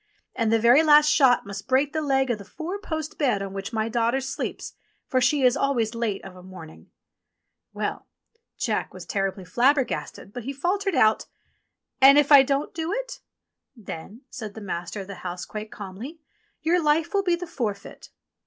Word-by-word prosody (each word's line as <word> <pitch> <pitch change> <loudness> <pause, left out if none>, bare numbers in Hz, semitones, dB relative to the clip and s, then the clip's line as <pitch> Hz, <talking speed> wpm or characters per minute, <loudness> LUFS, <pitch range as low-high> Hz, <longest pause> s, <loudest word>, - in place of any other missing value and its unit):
And 225 -2 0
the 225 - +4
very 235 +6 +6
last 300 -1 +6
shot 265 -5 +4
must 200 +1 -8
break 270 +3 +2
the 315 - -1
leg 270 -3 +1
of 220 - -2
the - - -9
four 335 - -6
post 315 -6 -5
bed 245 -9 +1
on 195 -1 -6
which 195 +2 -5
my 220 -1 -1
daughter 235 +2 +1
sleeps, 265 0 -5 0.3
for 255 -2 +1
she 270 +3 +2
is 250 0 +5
always 250 -6 0
late 230 -4 -3
of 190 -1 -10
a 180 - -12
morning 180 -4 -12 0.4
!" - - -57
Well! - - -4 0.5
Jack - - -2
was - - -9
terribly 195 -2 -2
flabbergasted, 245 - 0
but 245 - -6
he 275 - -3
faltered 380 +6 -1
out: 220 -4 +3 0.7
"And 275 +2 +8
if 295 0 +3
I 285 -2 +10
don't 275 +2 -1
do 325 +1 -3
it?" - - -4 0.6
"Then," 210 +1 -9
said 215 -5 -7
the - - -7
master 180 -1 -5
of 190 - -9
the 200 - -7
house 180 0 -5
quite 215 0 -7
calmly, 215 - -8 0.4
"your 345 +3 +2
life 310 +5 +1
will 400 - +3
be 355 -3 +1
the 350 +1 -6
forfeit." 220 - -5
250 Hz, 190 wpm, -25 LUFS, 205-295 Hz, 0.7 s, I